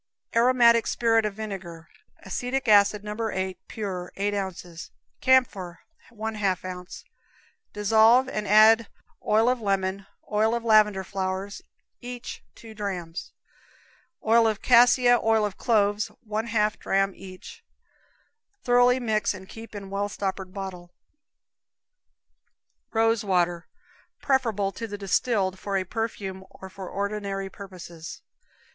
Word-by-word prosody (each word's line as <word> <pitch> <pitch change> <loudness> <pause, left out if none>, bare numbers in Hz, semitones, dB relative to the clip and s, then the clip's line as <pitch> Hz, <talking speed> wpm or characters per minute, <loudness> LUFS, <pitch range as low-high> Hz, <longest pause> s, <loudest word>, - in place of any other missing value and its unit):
Aromatic 235 -1 +5
Spirit 225 -2 +2
of 205 - -7
Vinegar. 190 -6 -7 0.4
Acetic 250 +7 -3
acid, 205 0 +5
No. 210 0 -5
8. 190 -2 -3
pure, 185 -5 -5
8 205 +1 -1
ounces; 180 -4 -5 0.3
camphor, 205 -10 +2 0.3
1/2 210 -5 -2
ounce. 180 0 -8 0.7
Dissolve 220 +5 +4
and 210 -5 -4
add 220 +2 +6 0.4
oil 225 +4 +3
lemon, 195 -1 -1 0.2
oil 220 +3 +2
lavender 215 -4 +4
flowers, 190 +1 -4 0.4
each 245 -1 -8
two 225 -1 -12
drams; 185 -6 -5 0.9
oil 225 0 +5
cassia, 245 +2 +5
oil 220 -2 +2
cloves, 205 -1 +1 0.2
1/2 215 0 0
dram 195 0 +1
each. 185 -1 -12 1.0
Thoroughly 245 +1 +4
mix 215 -4 0
and 190 0 -11
keep 225 +1 -11
in 195 -1 -8
well 200 +1 -1
stoppered 190 -2 -4
bottle. 185 -3 -7 2.0
Rose 225 -1 +2
Water. 175 -3 0 0.5
Preferable 225 -8 0
to 230 - -6
the 205 -1 -6
distilled 195 -1 0
for 200 -1 -2
a 190 - 0
perfume, 195 -2 -4
or 190 -1 -12
for 190 -1 -8
ordinary 200 -1 -3
purposes. 175 -4 -10
205 Hz, 110 wpm, -26 LUFS, 190-225 Hz, 2.0 s, add